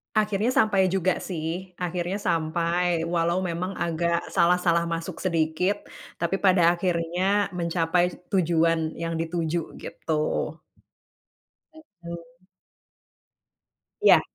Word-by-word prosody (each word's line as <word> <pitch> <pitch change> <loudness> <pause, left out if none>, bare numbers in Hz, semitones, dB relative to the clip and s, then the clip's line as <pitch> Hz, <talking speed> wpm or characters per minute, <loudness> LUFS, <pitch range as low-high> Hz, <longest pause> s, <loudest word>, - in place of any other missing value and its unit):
Akhirnya 210 +1 +1
sampai 195 -4 +4
juga 185 -1 +2
sih 180 +1 -4
akhirnya 175 +2 -2
sampai 170 +2 +1 0.3
walau 170 +1 +2
memang 180 +3 -3
agak 170 0 0 0.2
salah-salah 170 -1 +3
masuk 165 0 -5
sedikit, 170 +3 +1 0.4
tapi 170 +3 0
pada 185 -1 +5
akhirnya 175 0 -1 0.4
mencapai 170 0 +1 0.3
tujuan 165 -3 +3 0.2
yang 165 0 -2
dituju 165 0 -1 0.2
gitu. - - -7 1.6
Mhm. 170 - -12 1.6
Ya. - - +7
170 Hz, 90 wpm, -25 LUFS, 165-185 Hz, 1.6 s, Ya